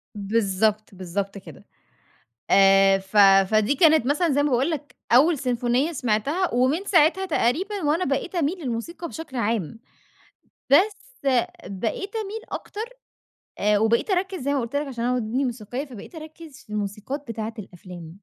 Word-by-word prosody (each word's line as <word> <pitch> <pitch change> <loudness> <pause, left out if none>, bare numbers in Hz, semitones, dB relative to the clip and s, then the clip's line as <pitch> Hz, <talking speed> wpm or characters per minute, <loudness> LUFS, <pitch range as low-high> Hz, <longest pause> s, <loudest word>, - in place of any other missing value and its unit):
بالضبط، 205 0 0
بالضبط 195 +2 -4
كده. 190 - -13 0.9
آآ، 195 0 +6
ف 195 +2 -5 0.3
فدي 215 +6 +3
كانت 315 -4 +5
مثلًا 305 +5 +1
زي 285 +1 +2
ما 295 - +1
باقول 260 +4 +1
لك 300 -3 -5 0.2
أول 295 +6 +5
سيمفونية 250 +3 0
سمعتها، 275 - -1
ومن 265 +10 +1
ساعتها 355 +1 +3
تقريبًا 370 - -1
وأنا 315 +5 +1
بقيت 275 +7 -2
أميل 345 +2 0
للموسيقى 265 +8 -4
بشكل 315 -6 -8
عام. 225 -3 -2 0.9
بس 380 +9 +3 0.6
بقيت 395 - -4
أميل 440 0 -4
أكتر 420 - -6 0.8
آآ، 210 0 +3
وبقيت 225 - +1
أركز 375 0 -1
زي 280 +2 -1
ما 280 - +1
قلت 235 +4 -6
لك 290 0 -1
عشان 240 -3 -5
أنا 250 - +1
ودني 245 +3 -1
موسيقية، 245 +3 -4
فبقيت 260 - -12
أركز 310 -2 -11
في - - -33
الموسيقات 210 +8 -4
بتاعة 225 0 -5
الأفلام. 180 -3 -10
255 Hz, 150 wpm, -24 LUFS, 215-320 Hz, 0.9 s, آآ